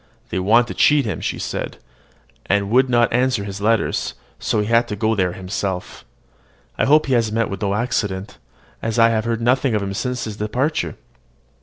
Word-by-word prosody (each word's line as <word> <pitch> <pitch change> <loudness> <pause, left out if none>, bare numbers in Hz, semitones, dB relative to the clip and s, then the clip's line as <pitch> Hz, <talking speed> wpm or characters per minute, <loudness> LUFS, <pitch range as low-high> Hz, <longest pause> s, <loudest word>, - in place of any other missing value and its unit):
"They - - -1
wanted 110 +6 +4
to - - -3
cheat 145 -3 +4
him," 105 - -3
she - - -2
said, - - -4 0.7
"and 100 +1 +1
would 130 +2 +4
not 120 -2 +3
answer 125 -3 +1
his 100 0 -6
letters; 115 +1 0 0.2
so - - 0
he 105 +3 -2
is 115 +1 +5
gone 110 +2 +1
there 90 -3 0
himself. 95 0 -4 0.7
I - - +1
hope 150 +2 +5
he 135 - 0
has 115 -3 +2
met 115 -1 0
with 100 - -5
no 100 -1 0
accident, 105 -5 -2 0.4
as 115 0 -2
I 115 0 +6
have 110 -1 0
heard 115 0 -1
nothing 125 0 +2
of 105 - 0
him 100 0 -3
since 125 +4 -2
his 105 -2 -5
departure." 110 - -1
110 Hz, 190 wpm, -20 LUFS, 100-120 Hz, 0.7 s, I